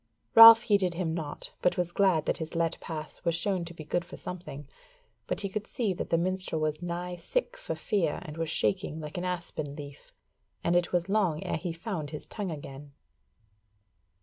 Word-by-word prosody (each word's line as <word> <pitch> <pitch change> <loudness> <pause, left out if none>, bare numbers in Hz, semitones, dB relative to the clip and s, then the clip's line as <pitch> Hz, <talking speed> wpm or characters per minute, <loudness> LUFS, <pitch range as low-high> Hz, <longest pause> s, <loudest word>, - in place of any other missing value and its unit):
Ralph 230 0 +11
heeded 190 -5 +2
him 165 -2 -1
naught, 160 -3 -4
but 180 - +2
was 175 -1 0
glad 180 -5 +3
that - - 0
his 160 +1 -6
let 165 -1 0
pass 155 -2 -7
was 170 - +1
shown 180 0 -1
to 170 - -8
be 155 - -8
good 170 +3 -1
for 170 - -11
something; 160 -6 -7 0.6
but - - -2
he 200 - -1
could 210 +2 -4
see 220 -6 -1
that - - -5
the 165 - +3
minstrel 185 -1 -1
was 155 0 -1
nigh 175 +1 -4
sick - - -2
for - - -5
fear 190 -9 0
and 155 -4 -8
was 165 -1 -2
shaking 185 -1 0
like 155 +3 -5
an 180 - -3
aspen 170 -5 -4
leaf, 145 -1 -10 0.5
and 170 - +2
it 175 0 +2
was 175 0 +1
long 195 -7 +1
ere - - -1
he 175 +1 -4
found 165 -3 -4
his 150 0 -7
tongue 205 -4 -4
again. 145 -2 -8
170 Hz, 200 wpm, -29 LUFS, 155-190 Hz, 0.6 s, Ralph